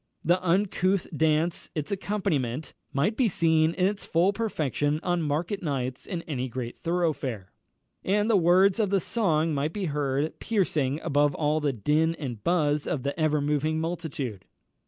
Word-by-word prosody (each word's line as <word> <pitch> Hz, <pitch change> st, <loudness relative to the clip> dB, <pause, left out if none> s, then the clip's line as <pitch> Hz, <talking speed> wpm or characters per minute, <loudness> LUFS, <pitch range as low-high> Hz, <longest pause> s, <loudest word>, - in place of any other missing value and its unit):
The 180 Hz, +3 st, +2 dB
uncouth 185 Hz, +1 st, +1 dB
dance, 160 Hz, +2 st, +1 dB
its 150 Hz, +2 st, -3 dB
accompaniment, 160 Hz, -, -2 dB, 0.2 s
might 170 Hz, +11 st, +1 dB
be 255 Hz, -1 st, +3 dB
seen 165 Hz, -4 st, +2 dB
in 185 Hz, -, +2 dB
its 200 Hz, +1 st, -1 dB
full 175 Hz, +5 st, +2 dB
perfection 155 Hz, -, -1 dB
on 175 Hz, -1 st, 0 dB
market 160 Hz, +6 st, -1 dB
nights 130 Hz, -5 st, -3 dB
in 175 Hz, -3 st, -4 dB
any 130 Hz, -4 st, -3 dB
great 120 Hz, 0 st, -5 dB
thoroughfare; 155 Hz, -, -2 dB, 0.5 s
and 205 Hz, +2 st, +1 dB
the 225 Hz, -, +3 dB
words 185 Hz, +3 st, +4 dB
of 210 Hz, -3 st, +2 dB
the 195 Hz, 0 st, +2 dB
song 165 Hz, -7 st, +1 dB
might 145 Hz, +3 st, -1 dB
be 200 Hz, -2 st, -2 dB
heard, 145 Hz, -1 st, -1 dB
piercing 155 Hz, -, 0 dB
above 145 Hz, 0 st, +2 dB
all 150 Hz, 0 st, +1 dB
the 150 Hz, -2 st, +1 dB
din 150 Hz, +8 st, +1 dB
and 125 Hz, -9 st, -6 dB
buzz 150 Hz, -4 st, +1 dB
of 130 Hz, -, -2 dB
the 140 Hz, 0 st, -2 dB
ever 155 Hz, -2 st, +2 dB
moving 150 Hz, +2 st, 0 dB
multitude. 160 Hz, -, -4 dB
160 Hz, 160 wpm, -27 LUFS, 145-180 Hz, 0.5 s, words